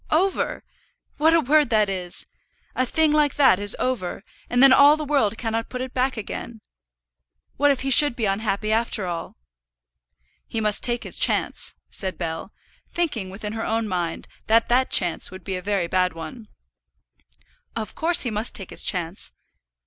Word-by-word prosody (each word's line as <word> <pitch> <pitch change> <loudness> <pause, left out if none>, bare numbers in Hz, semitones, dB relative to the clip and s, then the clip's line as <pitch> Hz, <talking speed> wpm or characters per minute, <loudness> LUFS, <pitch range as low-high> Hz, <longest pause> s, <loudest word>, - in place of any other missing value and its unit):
"Over! 370 +5 0 0.5
What 320 +2 +4
a - - +5
word 295 -1 +3
that 215 -3 +3
is! 180 -2 -5 0.5
A 255 - 0
thing 315 +3 +2
like 300 -2 +2
that 265 -10 +5
is 205 0 +1
over, 225 -7 -3 0.3
and 245 +2 +3
then 270 -1 +9
all 285 +3 +6
the 305 - -4
world 265 -7 +1
cannot 225 -1 -3
put 250 - -5
it 255 0 -5
back 255 0 0
again. 220 +1 -7 1.0
What 290 +1 +4
if 275 -2 +1
he 270 +1 -2
should 290 0 +5
be 230 - -1
unhappy 210 +1 -1
after 220 -3 +2
all?" 170 -2 -5 1.1
"He 225 - -3
must 210 -1 +1
take 240 -1 +1
his - - -6
chance," - - 0 0.2
said 190 -2 -4
Bell, 165 +3 -5 0.4
thinking 270 - -2
within 210 +2 -6
her 225 0 -4
own 225 0 -1
mind 175 -4 -3 0.2
that 225 +1 +3
that 255 +2 +3
chance 175 -3 +2
would 185 0 -11
be 190 - -4
a 180 - -4
very 195 -2 -1
bad 180 +1 +1
one. 165 +8 -9 1.3
"Of 220 -2 -4
course 340 +2 +2
he 240 - -1
must 215 +3 -4
take 195 - -7
his - - -3
chance. 180 0 -2
225 Hz, 175 wpm, -23 LUFS, 195-260 Hz, 1.3 s, then